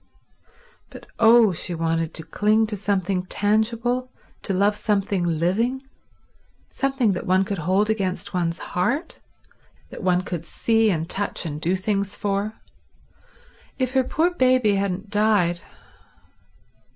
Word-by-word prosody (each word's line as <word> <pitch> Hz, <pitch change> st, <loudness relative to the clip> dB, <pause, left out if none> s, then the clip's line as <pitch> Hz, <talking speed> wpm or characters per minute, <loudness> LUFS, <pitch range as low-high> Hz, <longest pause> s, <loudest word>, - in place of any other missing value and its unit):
But -, -, -12 dB
oh, 225 Hz, -3 st, +6 dB
she 175 Hz, +1 st, -3 dB
wanted 165 Hz, 0 st, -1 dB
to 160 Hz, -, -1 dB
cling 215 Hz, +6 st, +2 dB
to 215 Hz, -1 st, -4 dB
something 190 Hz, -2 st, -1 dB
tangible, 230 Hz, +5 st, 0 dB, 0.3 s
to -, -, -3 dB
love 200 Hz, +2 st, +2 dB
something 200 Hz, -3 st, 0 dB
living, 185 Hz, -, 0 dB, 0.9 s
something 270 Hz, -5 st, +1 dB
that 180 Hz, -, -5 dB
one 185 Hz, +1 st, +3 dB
could 200 Hz, -1 st, -3 dB
hold 190 Hz, +6 st, +1 dB
against 195 Hz, -4 st, -2 dB
one's 170 Hz, -2 st, -1 dB, 0.2 s
heart, 275 Hz, -, -1 dB, 0.7 s
that -, -, -8 dB
one 180 Hz, -1 st, +1 dB
could 175 Hz, -3 st, -5 dB
see 225 Hz, +5 st, +1 dB
and 165 Hz, -4 st, -1 dB
touch 200 Hz, -1 st, -2 dB
and 150 Hz, -2 st, -5 dB
do 175 Hz, +3 st, +1 dB
things 200 Hz, +1 st, -2 dB
for. 200 Hz, +1 st, -2 dB, 1.2 s
If 255 Hz, -2 st, -1 dB
her 265 Hz, 0 st, +2 dB
poor 330 Hz, +7 st, +1 dB
baby 255 Hz, -7 st, +3 dB
hadn't 195 Hz, +1 st, -2 dB
died 205 Hz, -5 st, +2 dB
200 Hz, 130 wpm, -23 LUFS, 180-225 Hz, 1.2 s, oh